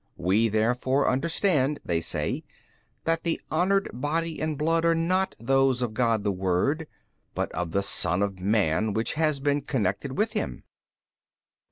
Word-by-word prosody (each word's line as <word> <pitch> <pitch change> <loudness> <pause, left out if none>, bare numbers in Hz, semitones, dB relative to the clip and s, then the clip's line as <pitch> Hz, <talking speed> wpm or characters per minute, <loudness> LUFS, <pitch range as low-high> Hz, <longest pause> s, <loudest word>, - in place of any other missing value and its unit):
WE 100 +6 +2
therefore 125 +5 +1
understand 150 0 +1
(they 85 -1 0
say) - - -2 0.6
that 165 0 0
the 165 -1 -1
honoured 195 +5 +2
body 155 +5 -2
and 155 -1 -1
blood 165 +2 +1
are 165 0 +3
not 185 +4 0
those 135 +1 +2
of 115 -3 -3
God 115 -3 +1
the 100 - +1
Word 95 - 0 0.5
but - - -2
of 85 +1 -3
the 100 +4 0
son 95 -2 +3
of 100 -2 -3
man 100 0 +1
which 110 +2 -1
has 155 -2 +1
been 145 +1 +1
connected 130 - -2
with 215 +2 +1
Him. - - -3
130 Hz, 155 wpm, -26 LUFS, 100-160 Hz, 0.6 s, are